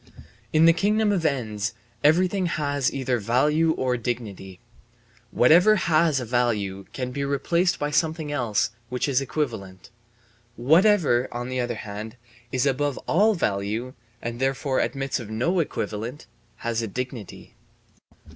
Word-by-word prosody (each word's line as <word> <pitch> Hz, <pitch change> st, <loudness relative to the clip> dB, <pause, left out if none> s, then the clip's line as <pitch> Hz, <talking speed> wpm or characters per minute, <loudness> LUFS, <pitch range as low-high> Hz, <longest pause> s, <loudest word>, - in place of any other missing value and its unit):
In 155 Hz, +1 st, +5 dB
the 165 Hz, -, +7 dB
kingdom 210 Hz, +4 st, +2 dB
of 175 Hz, -5 st, +1 dB
ends 110 Hz, -4 st, -2 dB, 0.3 s
everything 180 Hz, +5 st, +3 dB
has 145 Hz, -5 st, 0 dB
either 130 Hz, -3 st, -1 dB
value 150 Hz, +9 st, +2 dB
or 125 Hz, -3 st, -1 dB
dignity. 105 Hz, -6 st, -5 dB, 0.7 s
Whatever 175 Hz, -, +5 dB
has 160 Hz, -5 st, +2 dB
a 125 Hz, -, -4 dB
value 105 Hz, -5 st, -1 dB
can 125 Hz, -1 st, -4 dB
be 140 Hz, +2 st, -3 dB
replaced 170 Hz, +6 st, +1 dB
by 145 Hz, 0 st, -2 dB
something 155 Hz, 0 st, 0 dB
else 120 Hz, -5 st, 0 dB, 0.2 s
which 125 Hz, +2 st, -1 dB
is 135 Hz, -1 st, +2 dB
equivalent; 110 Hz, -, -4 dB, 0.6 s
whatever, 155 Hz, -, +3 dB
on 120 Hz, +1 st, -5 dB
the 130 Hz, 0 st, -2 dB
other 120 Hz, -1 st, -1 dB
hand, 105 Hz, +1 st, -7 dB, 0.4 s
is 130 Hz, +1 st, +1 dB
above 140 Hz, 0 st, 0 dB
all 210 Hz, +5 st, +3 dB
value, 110 Hz, -, -2 dB, 0.3 s
and 120 Hz, 0 st, -4 dB
therefore 135 Hz, 0 st, 0 dB
admits 135 Hz, -1 st, -1 dB
of 115 Hz, -4 st, -8 dB
no 130 Hz, +12 st, 0 dB
equivalent, 120 Hz, -3 st, -3 dB, 0.3 s
has 115 Hz, -1 st, -2 dB
a 115 Hz, -, -3 dB
dignity. 125 Hz, -1 st, -7 dB
130 Hz, 135 wpm, -24 LUFS, 115-155 Hz, 0.7 s, the